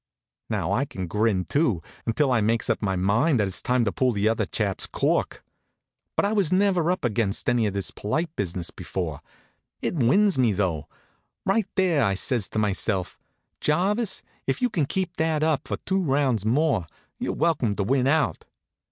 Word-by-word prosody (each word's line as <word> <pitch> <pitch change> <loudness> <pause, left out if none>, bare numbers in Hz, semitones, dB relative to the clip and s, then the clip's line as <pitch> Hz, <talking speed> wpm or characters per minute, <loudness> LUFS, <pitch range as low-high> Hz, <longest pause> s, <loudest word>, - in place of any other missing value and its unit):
Now, - - -1
I 135 - +1
can 95 -10 -5
grin, 100 0 +1
too, 130 - +1 0.2
until 130 +4 +2
I 120 -3 +3
makes 115 +2 +1
up - - -1
my 95 -3 0
mind 110 - +2
that 105 - +2
it's 95 - -3
time 125 -2 +1
to 100 - +1
pull 130 +4 +1
the 105 0 +1
other 115 0 +1
chap's 100 -4 -1
cork. - - -1 0.7
But - - +2
I 205 - +1
was 195 -6 +2
never 185 -3 +3
up 180 -6 0
against 110 0 -1
any 120 -3 +3
of 100 - -3
this 100 - -1
polite 160 +11 -2
business 90 -3 -3
before. 85 -3 -4 0.6
It - - -2
wins 170 - +3
me, 120 -5 +3
though. 90 -6 -1 0.6
Right 205 +1 +2
there 180 -7 +3
I 100 -3 +2
says 115 +1 0
to - - -5
myself: 100 -2 -1 0.4
"Jarvis, 195 +8 +1 0.2
if - - 0
you 250 -2 +1
can 155 -9 0
keep 185 0 -2
that 160 -1 +1
up 155 -3 +1
for - - -2
two 190 0 -1
rounds 135 - +1
more, 135 - +2 0.3
you're - - -2
welcome 130 -11 +1
to 100 - -1
win 130 +4 +2
out." 155 +1 +1
125 Hz, 185 wpm, -25 LUFS, 100-160 Hz, 0.7 s, I